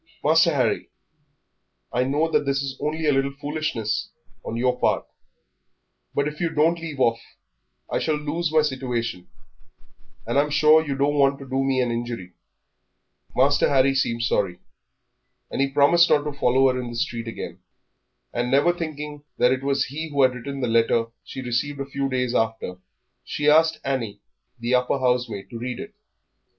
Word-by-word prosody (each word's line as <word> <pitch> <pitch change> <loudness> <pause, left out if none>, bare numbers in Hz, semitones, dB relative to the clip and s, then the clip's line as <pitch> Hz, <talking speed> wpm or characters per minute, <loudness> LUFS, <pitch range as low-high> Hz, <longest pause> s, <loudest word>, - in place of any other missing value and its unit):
"Master - - +5
Harry, - - 0 1.0
I 125 +1 +2
know 145 +5 +1
that - - +3
this 140 0 0
is 135 -1 -4
only 155 +1 -2
a 150 - +4
little 135 0 0
foolishness 145 -8 -2 0.3
on 115 - -4
your 125 +1 +1
part, - - +1 1.1
but 140 0 +1
if 150 +2 -6
you 170 - +1
don't 165 +2 +2
leave 160 -4 -6
off 115 -2 +3 0.7
I - - -1
shall 155 - 0
lose 150 +2 -2
my 155 -1 +4
situation, 120 -9 -3 1.0
and 120 +5 +1
I'm 150 +1 +2
sure 155 +2 +5
you 140 -3 -3
don't 140 +2 +1
want 140 0 +4
to 135 - -10
do 135 +1 0
me 135 -1 +1
an 120 -1 0
injury." 115 -6 -4 1.0
Master 140 +2 +3
Harry 135 0 +4
seemed 115 -3 0
sorry, 95 -6 0 0.9
and - - -1
he 140 - +2
promised 145 +5 +5
not 145 - +4
to 150 -1 -4
follow 130 -1 +3
her 130 - -2
in 120 - -6
the 120 - -7
street 115 0 -3
again. 115 - -6 0.7
And 120 +1 -1
never 140 +6 +4
thinking 150 -3 -6
that 125 - +4
it 130 0 0
was 135 -1 +1
he 155 +4 -5
who 140 -2 +2
had 130 -1 +4
written 135 +3 -6
the 125 - 0
letter 115 0 +2
she 130 - -7
received 130 +4 -2
a 140 - -2
few 140 0 -2
days 125 -2 -1
after, 110 -6 -1 0.4
she 145 - -2
asked 160 +2 +5
Annie, 130 -7 -2 0.4
the 120 +1 -2
upper 125 +2 +2
housemaid, 125 -6 -1
to 115 - -6
read 125 +1 -4
it. 210 +1 -8
135 Hz, 175 wpm, -24 LUFS, 120-145 Hz, 1.1 s, Master